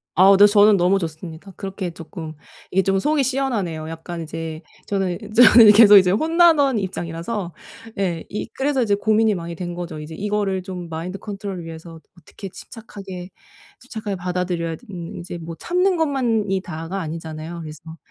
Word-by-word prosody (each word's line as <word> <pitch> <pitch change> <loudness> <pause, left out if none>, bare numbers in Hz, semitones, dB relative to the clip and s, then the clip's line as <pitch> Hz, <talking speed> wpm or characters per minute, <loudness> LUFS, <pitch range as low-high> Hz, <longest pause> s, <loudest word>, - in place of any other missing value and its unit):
아우 190 +2 +7
네 205 - +8
저는 205 0 +5
너무 185 +2 +3
좋습니다. 165 +2 -7
그렇게 195 -2 -5
조금 160 -1 -9 0.4
이게 190 +1 +2
좀 195 +1 +1
속이 300 +4 +1
시원하네요. 220 - -2
약간 165 +1 -7
이제 160 0 -6 0.2
저는 190 -3 -1
이 - - -11
저는 235 -1 +8
이 - - +11
계속 210 -1 +8 0.2
혼나던 320 -5 +4
입장이라서. 175 +1 -4 0.5
예 175 -4 -1
이 210 - -4
그래서 270 -1 0
이제 205 -3 +1
고민이 215 +1 +2
많이 170 -1 -6
된 175 +1 -5
거죠. 175 -3 -6
이제 150 +1 -8
이거를 205 -1 -1
좀 180 -2 -7
마인드 165 +4 -5
컨트롤을 195 -3 -6
위해서 165 0 -10 0.2
어떻게 185 +4 -10
침착하게, 195 -4 -10 0.5
침착하게 220 -5 -6
받아들여야 180 -2 -2
되는 180 -6 -9
이제 175 0 -7
뭐 165 0 -7
참는 360 +1 +1
것만이 230 - 0
다가 170 +2 -6
아니잖아요. 160 0 -6
그래서 160 +1 -10
190 Hz, 375 characters per minute, -21 LUFS, 165-210 Hz, 0.5 s, 이